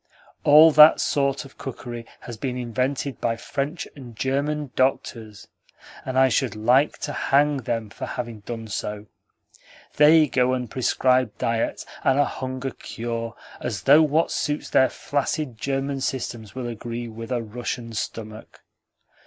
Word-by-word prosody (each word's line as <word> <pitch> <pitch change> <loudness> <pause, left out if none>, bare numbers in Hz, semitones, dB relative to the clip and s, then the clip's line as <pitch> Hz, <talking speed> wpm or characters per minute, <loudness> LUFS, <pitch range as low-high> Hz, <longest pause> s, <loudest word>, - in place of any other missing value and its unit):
All 155 +2 +8
that 155 +1 +8
sort 140 0 0
of 135 - -16
cookery 120 -3 -7
has 120 - -8
been 125 +3 -4
invented 125 +3 -2
by 115 -1 0
French 140 +7 -4
and 125 -5 -11
German 140 +3 -1
doctors, 110 -5 -1 0.6
and 130 0 -3
I 130 0 +6
should 125 -3 0
like 125 +7 +3
to - - -3
hang 145 +1 +2
them 115 -4 -3
for - - -6
having 120 -3 -5
done 115 +2 -7
so. 105 0 -4 0.9
They 155 +1 +7
go 125 -1 +2
and 125 -3 -3
prescribe 130 -2 +1
diets 115 0 -1 0.2
and 135 - +3
a 145 - +4
hunger 130 0 -4
cure 115 0 -5 0.2
as 105 -6 -4
though 145 +3 +7
what 155 +2 +2
suits 150 0 -2
their 130 - +5
flaccid 145 -3 -3
German 135 +1 -2
systems 120 -5 -4
will 130 -2 -4
agree 120 +1 -5
with 115 +1 -8
a 120 -2 -1
Russian 115 +1 -5
stomach! 110 0 -7
125 Hz, 145 wpm, -24 LUFS, 115-140 Hz, 0.9 s, All